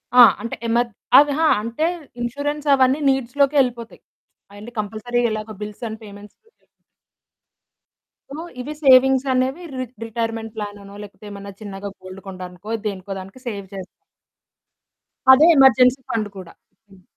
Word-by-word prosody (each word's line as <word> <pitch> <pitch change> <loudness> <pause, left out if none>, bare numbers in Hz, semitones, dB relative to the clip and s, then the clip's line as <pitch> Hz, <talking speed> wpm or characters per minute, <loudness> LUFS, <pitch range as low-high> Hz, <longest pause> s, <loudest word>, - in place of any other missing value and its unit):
ఆ! 250 - +9 0.2
అంటే 235 - -5
ఎమర్ 235 +1 +1 0.3
ఆ! - - +12
విహా 310 +3 +1
అంటే, 230 +8 -2 0.4
ఇన్‌ష్యూరెన్సవన్నీ 285 +1 +1
నీడ్స్‌లోకే 270 +2 +1
యెళ్ళిపోతాయి. 235 -3 -2 0.5
అయన్నీ 210 +4 -11
కంపల్సరీగెలాగో 220 0 -2
బిల్స్ 210 +2 -7
అండ్ 220 +1 -7
పేమెంట్స్‌‌ 205 0 -13
లోకెళ్ళిపోతాయి. 450 - -33 1.7
సో, 290 - -7 0.2
ఇవి 295 +4 -6
సేవింగ్సనేవి 265 +3 +4
రి 255 - -2 0.2
రిటైర్‌మెంట్ 225 -1 -4
ప్లాననో, 205 -1 -8
లేకపోతే 205 +1 -13
ఏమన్నా 200 0 -9
చిన్నగా 200 -1 -7
గోల్డ్ 185 +1 -10
కొండానికో 185 +2 -8 0.2
దేనికో 195 -1 -6
దానికి 195 +7 -11
సేవ్ 200 -4 -5
చేస్తా. 190 -2 -7 1.5
అదే 285 +5 +7
ఎమర్జెన్సీ 260 0 +5
ఫండు 215 -2 -2
కూడా. 180 -3 -10 0.4
హ్మ్. 190 -1 -19
230 Hz, 120 wpm, -21 LUFS, 205-260 Hz, 1.7 s, ఆ